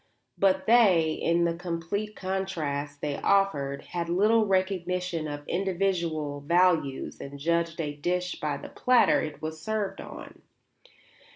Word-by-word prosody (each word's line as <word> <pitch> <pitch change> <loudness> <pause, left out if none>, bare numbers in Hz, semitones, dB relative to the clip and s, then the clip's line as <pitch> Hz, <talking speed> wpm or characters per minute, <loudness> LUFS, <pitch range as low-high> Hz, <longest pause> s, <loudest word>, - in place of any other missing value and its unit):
But 190 -1 +2
they, 190 -9 +5
in 170 +2 +1
the 170 - +1
complete 175 +5 -4
contrast 155 -7 -3
they 145 -1 -2
offered, 150 -9 +1
had 170 -1 -4
little 215 +5 +3
recognition 180 -3 -1
of 145 0 -7
individual 170 -6 -1
values 165 -3 +1
and 140 +1 -8
judged 170 +3 0
a 150 -3 -2
dish 180 +4 -2
by 150 -2 -2
the - - -9
platter 250 -1 +3
it 155 0 -6
was 155 0 -5
served 215 0 -2
on. - - -10
170 Hz, 130 wpm, -27 LUFS, 155-190 Hz, -, they